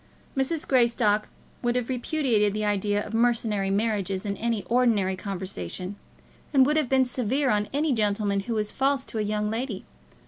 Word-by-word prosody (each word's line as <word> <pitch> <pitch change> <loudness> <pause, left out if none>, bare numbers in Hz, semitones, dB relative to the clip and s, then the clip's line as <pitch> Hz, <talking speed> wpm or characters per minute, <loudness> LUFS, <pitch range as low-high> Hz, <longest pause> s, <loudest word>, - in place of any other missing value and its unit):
Mrs. 295 +4 -1
Greystock 230 -4 +3 0.3
would 240 0 0
have 250 -2 0
repudiated 245 -6 +1
the 215 0 -1
idea 205 0 0
of 215 - -8
mercenary 225 -4 +1
marriages 200 -2 0
in 200 -1 -2
any 230 -2 -1
ordinary 225 -5 +2
conversation, 185 - -5 0.6
and 270 -3 +6
would 300 +3 +2
have 305 -5 +1
been 265 -1 +4
severe 255 +2 +1
on 210 0 0
any 290 +1 +1
gentleman 205 -2 +1
who 225 +4 -3
was 210 -1 -1
false 270 0 0
to 220 - -5
a - - +1
young 210 0 -1
lady. 225 -3 -3
220 Hz, 170 wpm, -26 LUFS, 205-255 Hz, 0.6 s, and